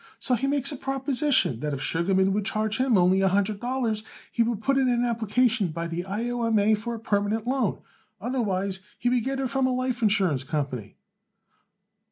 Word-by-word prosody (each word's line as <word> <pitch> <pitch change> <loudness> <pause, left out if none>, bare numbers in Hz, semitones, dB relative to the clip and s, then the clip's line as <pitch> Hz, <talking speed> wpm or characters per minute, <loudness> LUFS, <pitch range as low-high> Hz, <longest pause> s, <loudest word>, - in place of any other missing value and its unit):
So 255 - -1
he 250 +3 +1
makes 275 0 +2
a 285 - -5
proposition 270 - 0
that 150 +1 -2
if 135 - -6
Sugarman 190 +5 +2
would 210 +1 0
charge 215 +2 -1
him 255 -4 +3
only 185 +1 +4
a 195 - +4
hundred 200 +2 +1
dollars 240 -3 -1 0.3
he - - 0
would 230 -2 +1
put 275 0 +2
in 260 -1 +2
an 240 0 +2
application 230 -1 +1
by 165 +1 -4
the 170 +1 -3
I. 210 +5 -3
O. 245 0 -2
M. 225 -1 +2
A. 210 +1 +4
for 225 +3 -2
a - - -7
permanent 210 +1 0
loan. 265 +1 -1 0.4
Otherwise 200 -6 -1 0.2
he 245 - 0
would 245 -2 +1
get 270 +2 -2
it 260 -3 -2
from 270 -1 +2
a - - 0
life 255 -1 -1
insurance 190 - +2
company." 135 -7 -4
220 Hz, 205 wpm, -26 LUFS, 190-255 Hz, 0.4 s, only